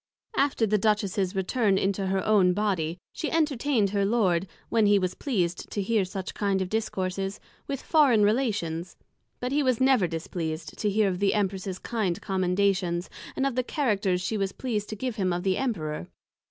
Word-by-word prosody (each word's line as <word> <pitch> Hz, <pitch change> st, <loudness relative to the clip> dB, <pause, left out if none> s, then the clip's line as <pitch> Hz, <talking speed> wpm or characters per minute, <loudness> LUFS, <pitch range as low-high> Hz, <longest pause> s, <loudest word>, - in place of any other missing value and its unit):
After 275 Hz, -5 st, +2 dB
the 210 Hz, 0 st, +2 dB
Duchess's 200 Hz, -2 st, +1 dB
return 195 Hz, +1 st, +1 dB
into 195 Hz, 0 st, 0 dB
her 190 Hz, 0 st, 0 dB
own 195 Hz, -4 st, +4 dB
body, 180 Hz, -5 st, -1 dB, 0.2 s
she 310 Hz, -, -3 dB
entertained 280 Hz, -9 st, +1 dB
her 200 Hz, -1 st, +1 dB
Lord 195 Hz, -4 st, +2 dB, 0.2 s
(when 220 Hz, -2 st, +3 dB
he 205 Hz, 0 st, +5 dB
was 185 Hz, -2 st, 0 dB
pleased 180 Hz, -11 st, -2 dB
to -, -, -4 dB
hear 205 Hz, 0 st, +1 dB
such 185 Hz, 0 st, -5 dB
kind 200 Hz, -2 st, 0 dB
of 190 Hz, -1 st, -2 dB
Discourses) 195 Hz, -2 st, -2 dB, 0.3 s
with 275 Hz, -2 st, -4 dB
Foreign 275 Hz, -9 st, +4 dB
Relations; 205 Hz, -7 st, 0 dB, 0.4 s
but 250 Hz, +1 st, -3 dB
he 290 Hz, +2 st, +2 dB
was 255 Hz, -4 st, +2 dB
never 260 Hz, -8 st, +4 dB
displeased 160 Hz, -1 st, -4 dB
to 210 Hz, -, +1 dB
hear 210 Hz, +1 st, +2 dB
of 180 Hz, -2 st, -1 dB
the 200 Hz, +1 st, +2 dB
Empress's 190 Hz, -2 st, -1 dB
kind 200 Hz, -7 st, -2 dB
Commendations, 185 Hz, -2 st, 0 dB, 0.2 s
and 270 Hz, -, 0 dB
of 275 Hz, -, 0 dB
the 255 Hz, -, +1 dB
Characters 205 Hz, -, 0 dB
she 205 Hz, +3 st, -2 dB
was 195 Hz, -1 st, -1 dB
pleased 215 Hz, -5 st, -3 dB
to 215 Hz, -, -4 dB
give 255 Hz, +4 st, -2 dB
of -, -, -18 dB
him 190 Hz, -3 st, +1 dB
to 175 Hz, 0 st, 0 dB
the 185 Hz, +1 st, 0 dB
Emperor. 155 Hz, -, -2 dB
200 Hz, 185 wpm, -27 LUFS, 185-225 Hz, 0.4 s, he